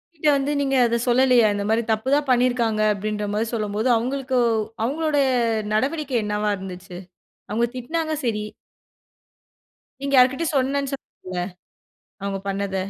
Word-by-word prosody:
கிட்ட 310 -1 -2
வந்து 275 +1 -1
நீங்க 270 -1 0
அத 235 0 +1
சொல்லலையா? 250 -1 +5
இந்த 205 - -2
மாரி 225 +1 +3
தப்பு 220 +4 0
தான் 290 -1 0
பண்ணியிருக்காங்க 245 -3 +2
அப்டின்ற 210 +1 -3
மாரி 215 +2 0
சொல்லும்போது 215 +1 -1
அவங்களுக்கு 260 +2 -1 0.5
அவங்களுடைய 290 +3 +1 0.5
நடவடிக்கை 275 +3 0
என்னவா 210 0 -1
இருந்துச்சு? 180 -1 -8 0.5
அவங்க 230 +3 +2
திட்னாங்க 315 +5 -2
சரி. 215 -3 0 1.6
நீங்க 275 0 -3
யார்கிட்டயோ 265 +6 +3
சொன்னேன்னு 275 +1 0
சொன்னீங்கல்ல, 185 -9 -6 0.8
அவங்க 200 -1 -2
பண்ணத. 195 0 -2
240 Hz, 125 wpm, -23 LUFS, 210-275 Hz, 1.6 s, சொல்லலையா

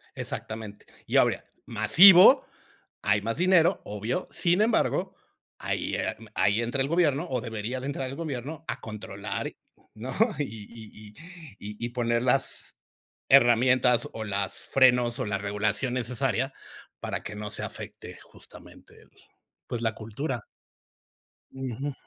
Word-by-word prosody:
Exactamente. 110 -2 -6 0.2
Y - - +1
obvia - - +2 0.2
masivo, 180 - +7 0.6
hay 100 0 +2
más 115 +5 -3
dinero, 180 -2 +4
obvio. 110 - -3
Sin 175 +3 +1
embargo, 220 +1 +1 0.4
ahí, - - -2 0.4
ahí 100 +3 +2
entra 120 +4 -1
el 135 - +1
gobierno, 165 -1 +2
o 125 -3 -1
debería 115 +3 -4
de 130 - -7
entrar 135 -2 -3
el 135 - -6
gobierno 155 0 -5
a - - -4
controlar, 100 -2 -5 0.4
¿no? 125 +5 -7 0.3
Y 145 - +1
y 110 -1 -11 0.5
y 105 +3 -6
y - - -3
poner 120 -1 0
las 130 +2 -1 0.5
herramientas 125 -1 +4
o 110 - -5
las 100 -1 -2
frenos, 125 -2 +4
o 130 - -2
la 100 -1 -1
regulación 105 +5 -1
necesaria 125 +1 -1 0.5
para - - -4
que 105 - -7
no 105 0 -6
se - - -4
afecte - - -8
justamente - - -15
el - - -23 0.6
pues, 120 -1 -4
la 110 -2 0
cultura. 115 +3 -5 1.1
Ujú. 135 +2 -4
120 Hz, 135 wpm, -27 LUFS, 110-135 Hz, 1.1 s, masivo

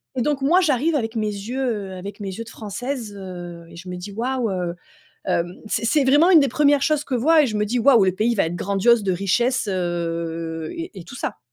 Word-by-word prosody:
et 245 - 0
donc 290 -2 0
moi, 335 +7 +4
j'arrive 305 -1 +1
avec 225 -3 -2
mes 215 -1 0
yeux, 210 +6 -4
heu, 205 -6 -2
avec 200 +3 -8
mes 200 -2 -4
yeux 230 - -5
de 225 - -12
Française, 225 +1 -5
heu, 175 -3 -8
et - - -13
je 180 +2 -11
me 180 0 -5
dis: 185 +3 -8
«Waouh!» 240 +2 -1
heu, 180 -2 -2 0.5
hem 175 +1 -1
c'est 230 - -1
c'est 285 +3 +3
vraiment 290 +6 +5
une 330 -4 +8
des 275 - +2
1res 285 +2 +3
choses 305 -1 +2
que 265 - -3
vois 305 +6 +4
et - - +2
je 215 -3 -3
me 210 - +1
dis: 240 +4 -1
«Waouh, 235 -4 +5
le 185 - +2
pays 230 +4 +1
va 195 - +2
être 165 +2 -3
grandiose 200 +5 +2
de 190 - +1
richesse» 220 +6 +1
heu 165 -2 -3
et 335 0 -5
et 170 - -10
tout - - -11
ça. - - -4
220 Hz, 245 wpm, -22 LUFS, 185-265 Hz, 0.5 s, une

